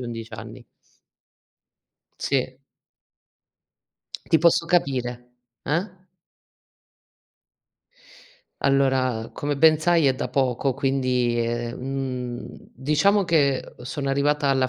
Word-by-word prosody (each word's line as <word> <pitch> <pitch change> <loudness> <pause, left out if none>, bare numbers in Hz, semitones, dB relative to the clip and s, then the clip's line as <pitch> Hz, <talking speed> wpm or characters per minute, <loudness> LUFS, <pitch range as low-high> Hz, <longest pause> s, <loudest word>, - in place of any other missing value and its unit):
11 115 -2 -7
anni. 100 - -10 1.5
Sì. 130 -1 -1 1.7
Ti 160 - +5
posso 170 0 +3
capire. 135 -9 +1 0.5
Eh? 170 +7 -1 2.7
Allora, 130 -4 +2
come 145 -1 -3
ben 155 +1 +6
sai 165 -2 +3
è 130 - +3
da - - -4
poco, 130 0 0
quindi 130 -3 0
è 120 +1 -2
mhmm, 125 -2 -4 0.3
diciamo 155 - +2
che, 145 -6 +1
uhm, - - -13
sono 140 +1 -4
arrivata 140 +1 +1
alla 130 -1 +2
135 Hz, 95 wpm, -24 LUFS, 125-150 Hz, 2.7 s, ben